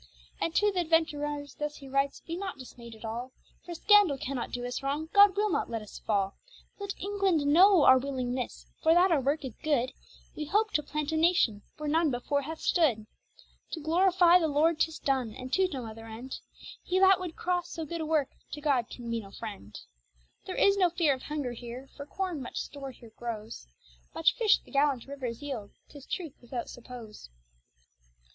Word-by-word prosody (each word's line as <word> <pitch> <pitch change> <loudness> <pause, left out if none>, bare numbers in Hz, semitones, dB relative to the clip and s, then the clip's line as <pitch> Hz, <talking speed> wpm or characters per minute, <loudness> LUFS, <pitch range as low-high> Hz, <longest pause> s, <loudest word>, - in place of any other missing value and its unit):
And 330 - -1
to 415 0 +4
th' 380 - -7
adventurers 295 -4 0
thus 295 0 -3
he 275 - -11
writes 275 +1 0
be 335 - -4
not 375 -4 -5
dismayed 235 -3 -11
at 220 - -11
all, 240 +3 -5 0.3
For 345 - -7
scandall 410 -6 +5
cannot 260 -2 -4
doe 245 0 -4
us 245 +2 -3
wrong, 290 +4 -2
God 405 -1 +7
will 420 0 +2
not - - 0
let 225 -2 -3
us 210 - -11
fall. 200 -2 0 0.5
Let 400 -1 -5
England 390 -6 +1
knowe 350 +3 +6
our 260 0 +8
willingnesse, 255 -2 -3 0.2
for 320 +1 +5
that 360 +1 +5
our 305 -4 +3
worke 285 +2 0
is 255 - -6
goode; 265 -5 +1 0.4
Wee 300 - -4
hope 425 +7 +1
to 300 - +1
plant 300 +1 -3
a 320 - 0
nation, 315 - +3 0.2
where 305 -1 -4
none 320 +1 +3
before 275 +3 -1
hath 315 +3 -7
stood. 260 -12 +2 0.7
To 330 - -3
glorifie 350 +2 +5
the 325 - +1
lord 310 +2 +2
tis 320 -1 +1
done; 260 -5 -1
and 255 +1 -8
to 380 0 +4
no 270 -9 -5
other 225 0 -9
end; 235 +4 -7 0.4
He 365 - -1
that 380 0 +6
would 360 -3 -5
crosse 355 -1 -1
so 325 - -5
good 335 +2 -4
a - - -2
work, 305 -4 +2 0.2
to 295 - -4
God 275 -6 +1
can 240 -1 -9
be 230 - 0
no 200 -3 -10
friend. 200 - -8 0.7
There 370 - -4
is 400 0 +4
no 365 -3 +4
feare 330 -4 +2
of 260 - -6
hunger 295 -4 -3
here 240 +3 -8
for 285 0 -8
corne 365 -4 -3
much 245 - -7
store 275 -2 -6
here 240 -3 -14
growes, 225 - -6 0.5
Much - - +4
fish 435 -4 +3
the - - -18
gallant 280 -3 +2
rivers 270 -3 -6
yeild, 245 -8 -5 0.2
tis 285 -2 -13
truth 330 -7 -4
without 240 0 -5
suppose. 235 - -10
290 Hz, 200 wpm, -29 LUFS, 245-335 Hz, 0.7 s, our